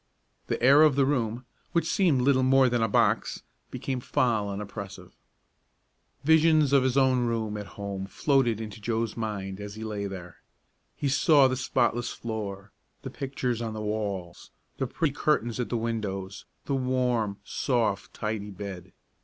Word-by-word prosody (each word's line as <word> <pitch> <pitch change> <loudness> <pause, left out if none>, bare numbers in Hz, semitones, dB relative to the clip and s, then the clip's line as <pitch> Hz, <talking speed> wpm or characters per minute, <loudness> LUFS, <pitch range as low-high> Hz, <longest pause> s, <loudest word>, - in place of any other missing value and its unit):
The - - -1
air 140 +4 +7
of 155 -3 +6
the 140 -1 +4
room, 120 -3 -1 0.3
which 170 - +1
seemed 165 -10 +3
little 135 0 +4
more 130 0 +5
than 120 -1 0
a 115 - +3
box, 100 - +1 0.3
became 130 -2 -3
foul 120 -6 0
and 100 0 -4
oppressive. 100 -2 -8 1.1
Visions 155 -2 +4
of 140 - +6
his 130 0 +1
own 130 -2 +3
room 110 -2 -2
at 105 -1 -5
home 100 -1 -4
floated 120 +1 +1
into 110 -1 -7
Joe's 115 0 -1
mind 100 -4 -4
as 105 0 -7
he 110 - -7
lay 105 -2 -3
there. 90 -3 -8 0.6
He 145 - -2
saw 140 0 +5
the 130 - -1
spotless 120 -2 0
floor, 105 -3 -5 0.3
the - - -6
pictures 130 -3 -3
on 110 -1 -4
the 110 - -4
walls, 100 -5 -4 0.3
the 135 - 0
pretty 150 +2 -1
curtains 125 -6 0
at 125 - -2
the 120 - 0
windows, 100 -4 -4 0.2
the 140 - -2
warm, 125 -5 0
soft, 115 -4 -1
tidy 105 -1 -4
bed. 95 -2 -8
115 Hz, 160 wpm, -27 LUFS, 100-130 Hz, 1.1 s, air